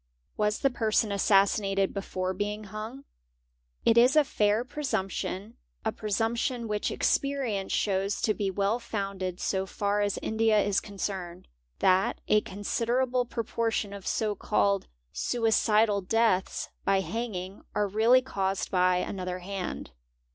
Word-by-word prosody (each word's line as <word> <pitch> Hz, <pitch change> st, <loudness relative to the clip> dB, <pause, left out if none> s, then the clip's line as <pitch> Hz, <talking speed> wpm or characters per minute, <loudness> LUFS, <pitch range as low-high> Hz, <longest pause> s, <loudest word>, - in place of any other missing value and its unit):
Was 210 Hz, 0 st, 0 dB
the 275 Hz, -, +3 dB
person 220 Hz, -3 st, +1 dB
"assassinated 195 Hz, 0 st, +2 dB
before 185 Hz, -2 st, -3 dB
being 210 Hz, +2 st, -3 dB
hung? 215 Hz, +6 st, -7 dB, 0.8 s
It 230 Hz, +1 st, +6 dB
isa 270 Hz, +6 st, +6 dB
fair 210 Hz, -2 st, +1 dB
presumption—a 220 Hz, -, -4 dB
presumption 230 Hz, +4 st, -1 dB
which 210 Hz, -1 st, -1 dB
experience 260 Hz, -9 st, 0 dB
shows 195 Hz, 0 st, 0 dB
to 215 Hz, -, +3 dB
be 200 Hz, -1 st, -1 dB
well 200 Hz, +4 st, 0 dB
founded 195 Hz, -5 st, -4 dB
so 190 Hz, 0 st, -1 dB
far 205 Hz, +1 st, 0 dB
as 205 Hz, -1 st, 0 dB
India 220 Hz, 0 st, +2 dB
is 200 Hz, -1 st, +2 dB
concerned— 190 Hz, -3 st, -5 dB, 0.3 s
that 190 Hz, +1 st, +2 dB
a 210 Hz, -, +4 dB
considerable 240 Hz, +6 st, 0 dB
proportion 230 Hz, -3 st, -2 dB
of 200 Hz, -1 st, -8 dB
so 215 Hz, -2 st, 0 dB
called 200 Hz, -1 st, +1 dB, 0.3 s
suicidal 220 Hz, -, +2 dB
deaths 205 Hz, -1 st, +1 dB
by 195 Hz, -1 st, +2 dB
hanging 195 Hz, -3 st, -4 dB
are 210 Hz, -, +2 dB
2 200 Hz, -, -13 dB
feally 235 Hz, +4 st, +6 dB
caused 195 Hz, -6 st, -2 dB
by 180 Hz, -1 st, +3 dB
another 180 Hz, 0 st, -3 dB
hand. 185 Hz, -, -5 dB
205 Hz, 125 wpm, -28 LUFS, 195-225 Hz, 0.8 s, It